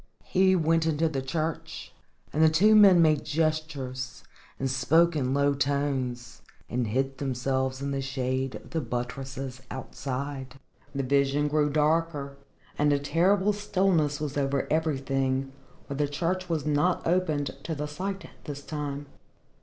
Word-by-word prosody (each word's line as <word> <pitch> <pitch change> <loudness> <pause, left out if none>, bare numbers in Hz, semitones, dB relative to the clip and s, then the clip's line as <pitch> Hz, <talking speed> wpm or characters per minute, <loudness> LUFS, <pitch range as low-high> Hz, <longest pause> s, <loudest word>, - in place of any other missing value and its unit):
He 190 0 +3
went 165 -1 +2
into 160 +1 +2
the 140 -4 -2
church, 155 +4 -4 0.4
and 155 - +1
the 160 - +7
two 195 +8 +5
men 195 -5 +8
made 155 -2 +3
gestures, 150 -5 -2 0.3
and 135 - -1
spoke 160 +6 +3
in 130 -4 0
low 140 +1 +3
tones, 135 -3 -2 0.3
and 120 -1 -1
hid 135 +4 -1
themselves 130 0 -1
in 140 - -2
the 135 0 -1
shade 130 -1 -2
of - - -11
the 160 - -1
buttresses 130 +1 -5
outside. 130 0 -5 0.4
The 135 - 0
vision 140 +2 +2
grew 150 0 +2
darker 150 -1 +1 0.4
and 150 0 +4
a 145 - +4
terrible 185 +8 +2
stillness 185 -7 +1
was 145 -2 -3
over 140 -1 0
everything, 135 -3 0 0.4
for - - -4
the 145 +1 0
church 175 +5 -2
was 160 -4 -1
not 150 +4 +1
opened 165 -5 0
to 160 - -4
the 150 0 -3
sight 190 +6 -4 0.2
this 145 -2 -6
time. 145 -1 -4
145 Hz, 145 wpm, -27 LUFS, 135-160 Hz, 0.4 s, men